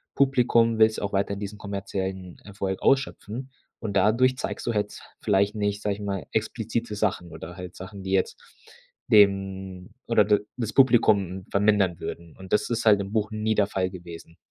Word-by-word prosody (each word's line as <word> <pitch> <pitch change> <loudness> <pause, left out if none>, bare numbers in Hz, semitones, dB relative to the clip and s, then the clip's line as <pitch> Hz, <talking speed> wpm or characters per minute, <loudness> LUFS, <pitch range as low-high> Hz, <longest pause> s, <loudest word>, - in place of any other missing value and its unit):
Publikum, 120 -4 +3
willst 110 0 +5
ja - - -4
auch 100 - -3
weiterhin 100 0 0
diesen 100 +1 -6
kommerziellen 95 -2 -5
Erfolg 95 -1 -4
ausschöpfen. 135 -2 0 0.3
Und 100 -3 -5
dadurch 120 +6 +3
zeigst - - -4
du 120 - 0
jetzt 105 -1 -3 0.2
vielleicht 100 0 +2
nicht, 105 0 -1
sage 105 -1 0
ich 105 - -10
mal, 100 -2 -3
explizite 115 0 -2
Sachen 95 -5 -1
oder 80 +2 -9
halt 90 -1 -9
Sachen, 95 +2 -9
die 95 - -4
jetzt 95 -1 0 0.7
dem 95 -3 +2 0.2
oder 110 -3 +4
d 105 0 +4 0.2
das 115 -3 -3
Publikum 100 -8 +3
vermindern 100 -4 +2
würden. 85 -1 -7
Und 95 -1 -12
das 105 0 +2
ist 115 0 -1
halt 105 -2 +6
im 100 +1 -5
Buch 110 -1 0
nie 110 +1 0
der 100 - +3
Fall 95 -2 -1
gewesen. 85 -2 -11
100 Hz, 180 wpm, -25 LUFS, 95-110 Hz, 0.7 s, halt